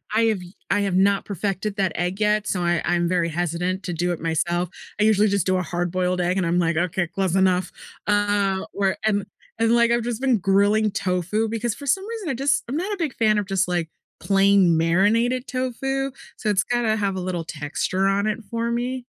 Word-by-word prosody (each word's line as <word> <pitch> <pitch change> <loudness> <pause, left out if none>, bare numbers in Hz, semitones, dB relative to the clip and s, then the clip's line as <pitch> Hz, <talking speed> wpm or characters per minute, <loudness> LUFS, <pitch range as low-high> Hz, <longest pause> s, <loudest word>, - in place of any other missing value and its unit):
I've 220 -4 +2 0.3
I 205 - +3
have 195 -2 0
not 195 +1 +3
perfected 200 +1 -3
that 190 -4 0
egg 180 +3 -2
yet, 210 0 +1
so 180 - -1
I 175 0 +1
I'm 175 0 +1
very 170 -1 +1
hesitant 175 +3 -2
to 175 - -3
do 175 +2 -1
it 170 - -3
myself. 170 +2 -1 0.3
I - - +3
usually 215 -1 +4
just 200 -3 +1
do 185 0 +2
a - - 0
hard 175 -1 -2
boiled 180 0 0
egg 180 +2 0
and 185 - +1
I'm 175 +1 +1
like, 165 -2 +1
"Ok, 175 0 0
close 190 +1 -1
enough." 185 -1 +2 0.4
Uh, 205 -2 +1
where 195 -1 0
and 205 -2 +1 0.3
and, 230 +1 +3
like, 235 0 +4
I've 235 0 +2
just 240 -1 -3
been 260 -4 +3
grilling 205 +3 +3
tofu 190 +3 -1
because 230 0 -2
for 285 - -10
some 385 +9 0
reason 445 -7 -5
I - - 0
just 275 +3 +1
I'm 265 - -3
not 380 +5 -2
a - - -4
big 315 -7 -2
fan 215 -2 +2
of 205 - 0
just 195 -1 0
like 175 -2 -1 0.3
plain 195 -4 +4
marinated 220 +10 +2
tofu, 270 +1 -2 0.3
so 215 - -2
it's 195 -1 +2
gotta 240 -3 0
have 200 -3 -1
a - - -3
little 180 -2 -3
texture 160 +6 -2
on 200 +1 +1
it 215 +1 -1
for 230 0 -2
me. 245 +1 -2
195 Hz, 215 wpm, -23 LUFS, 180-225 Hz, 0.4 s, usually